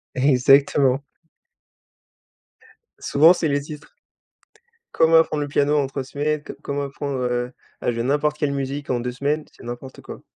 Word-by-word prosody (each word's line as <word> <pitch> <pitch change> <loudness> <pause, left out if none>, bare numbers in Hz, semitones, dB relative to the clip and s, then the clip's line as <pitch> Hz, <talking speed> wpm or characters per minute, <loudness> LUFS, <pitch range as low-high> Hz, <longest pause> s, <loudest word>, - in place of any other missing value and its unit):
Exactement. 135 0 +4 2.0
Souvent, 160 +5 +5
c'est 170 - -1
les 140 -1 0
titres 150 0 -11 1.0
«Comment 165 0 +4
apprendre 155 -2 +2
le 145 - -2
piano 145 +1 +2
en 140 -2 +1
3 135 0 -5
semaines», 150 +2 -2
«Co - - -7
comment 140 0 -3
apprendre, 140 -1 -4
heu, 125 0 -1 0.3
à - - 0
jouer 115 0 -3
n'importe 150 +3 0
quelle 145 -1 0
musique 140 +1 -4
en 125 - 0
2 125 +1 -3
semaines». 145 +4 -1
C'est - - -15
n'importe 120 +2 -8
quoi. - - -10
140 Hz, 155 wpm, -22 LUFS, 130-150 Hz, 2.0 s, Souvent